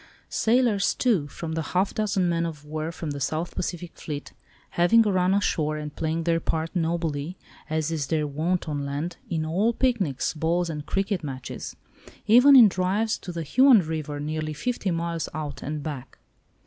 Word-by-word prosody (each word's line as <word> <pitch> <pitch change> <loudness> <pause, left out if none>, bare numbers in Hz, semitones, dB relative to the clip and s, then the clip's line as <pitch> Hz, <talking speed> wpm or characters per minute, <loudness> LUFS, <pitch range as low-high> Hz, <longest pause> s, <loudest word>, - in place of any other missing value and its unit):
Sailors 225 -3 +2
too, 205 - +1
from 160 +3 -6
the 160 0 -1
half 185 +5 0
dozen 200 -4 0
men 170 -1 +1
of 155 -3 -5
war 155 +2 -4
from 160 -2 -5
the 140 - -5
South 160 +5 -2
Pacific 175 -1 -4
fleet, 145 -2 -6 0.4
having 220 +7 +4
a 210 - +2
run 185 0 +2
ashore, 155 -6 +1
and 150 -1 -6
playing 165 +1 -1
their 165 0 +2
part 160 +2 -2
nobly, 165 -1 -1 0.3
as 155 0 -1
is 150 -4 -2
their 155 -1 0
wont 160 +5 -1
on 145 -2 -2
land, 145 +5 -4
in 160 -2 -1
all 195 +9 +1
picnics, 215 - 0
balls 165 +2 0
and 150 -1 -6
cricket 195 -2 -1
matches, 130 -3 -6 0.5
even 250 +6 +7
in 240 -4 +10
drives 195 +4 0
to 180 - -7
the 170 -1 -4
Huon 255 - +6
River 155 -3 -4
nearly 155 +1 -3
fifty 205 - -2
miles 170 -1 -2
out 150 -2 -5
and 150 0 -4
back. 140 -4 -7
165 Hz, 175 wpm, -25 LUFS, 155-190 Hz, 0.5 s, in